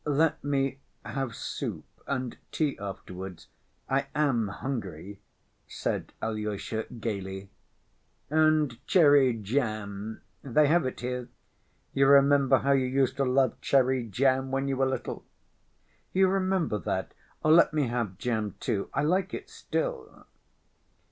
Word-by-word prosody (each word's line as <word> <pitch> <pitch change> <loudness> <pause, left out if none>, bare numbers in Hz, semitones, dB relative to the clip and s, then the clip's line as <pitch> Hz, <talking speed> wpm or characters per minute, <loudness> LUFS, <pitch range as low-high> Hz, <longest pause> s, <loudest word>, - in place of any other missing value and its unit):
"Let 150 +2 +1
me 135 -1 0 0.3
have 135 -4 -3
soup, - - -5 0.2
and 130 -3 -2 0.2
tea 150 -3 0
afterwards, 95 -2 -7 0.4
I 135 +1 0
am 135 -7 +2
hungry," 100 - -5 0.5
said - - -3
Alyosha 105 0 -3
gayly. 95 -3 -4 0.8
"And 155 -5 +2
cherry 145 -7 +6
jam? 110 -2 -3 0.2
They 145 +2 +3
have 160 0 +3
it - - -6
here. 125 0 -3 0.6
You 135 0 +4
remember 140 -1 +6
how 140 - +1
you 135 -2 +3
used 130 0 +1
to 135 - +2
love 130 +1 +2
cherry 130 -3 +2
jam 130 +5 +1
when 135 +1 -1
you 135 - 0
were 135 0 +2
little?" 130 - -4 0.9
"You 190 0 +4
remember 185 - 0
that? 95 +2 -3 0.3
Let 160 +2 +6
me 150 -2 +1
have 115 -6 -2
jam 110 -3 -2
too, 100 -2 -2
I - - +2
like 185 +5 +1
it 405 +2 -9
still." 460 0 -4
130 Hz, 130 wpm, -28 LUFS, 110-145 Hz, 0.9 s, cherry